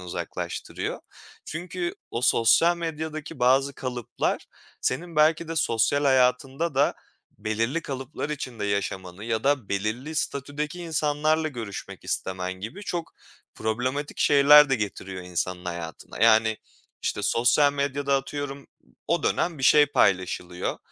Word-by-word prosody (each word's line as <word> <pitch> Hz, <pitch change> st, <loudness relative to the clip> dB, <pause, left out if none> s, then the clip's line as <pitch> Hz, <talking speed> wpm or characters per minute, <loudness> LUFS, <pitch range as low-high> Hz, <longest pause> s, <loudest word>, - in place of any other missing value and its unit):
uzaklaştırıyor. 90 Hz, -1 st, -5 dB, 0.4 s
Çünkü 175 Hz, +2 st, -4 dB, 0.2 s
o 115 Hz, -, -3 dB
sosyal 150 Hz, +9 st, +4 dB
medyadaki 160 Hz, -3 st, -5 dB
bazı 135 Hz, +3 st, +3 dB
kalıplar 125 Hz, -3 st, -3 dB, 0.3 s
senin 165 Hz, +5 st, -2 dB
belki 155 Hz, +2 st, +3 dB
de 165 Hz, -, -4 dB
sosyal 145 Hz, +2 st, +2 dB
hayatında 130 Hz, +3 st, +2 dB
da 140 Hz, +2 st, +3 dB, 0.4 s
belirli 115 Hz, +9 st, -1 dB
kalıplar 135 Hz, +2 st, -5 dB
içinde 130 Hz, -7 st, -4 dB
yaşamanı 95 Hz, -1 st, -3 dB
ya 115 Hz, 0 st, -1 dB
da 140 Hz, -6 st, +1 dB
belirli 110 Hz, +10 st, -2 dB
statüdeki 150 Hz, +3 st, -3 dB
insanlarla 155 Hz, -1 st, +1 dB
görüşmek 115 Hz, -8 st, -7 dB
istemen 95 Hz, -1 st, -2 dB
gibi 115 Hz, -, -7 dB
çok 175 Hz, -4 st, -4 dB, 0.4 s
problematik 130 Hz, +6 st, -2 dB
şeyler 145 Hz, +1 st, +7 dB
de 135 Hz, -, +4 dB
getiriyor 95 Hz, -3 st, -5 dB
insanın 90 Hz, 0 st, -3 dB
hayatına. 85 Hz, -2 st, -6 dB
Yani, 110 Hz, -1 st, +5 dB, 0.4 s
işte, -, -, -2 dB
sosyal 140 Hz, +5 st, +3 dB
medyada, 140 Hz, 0 st, 0 dB
atıyorum, 140 Hz, +1 st, -5 dB, 0.4 s
o 170 Hz, -, +1 dB
dönem 170 Hz, -3 st, 0 dB
bir 130 Hz, -, -7 dB
şey 150 Hz, +2 st, +7 dB
paylaşılıyor. 90 Hz, -6 st, 0 dB
135 Hz, 120 wpm, -26 LUFS, 110-150 Hz, 0.4 s, şeyler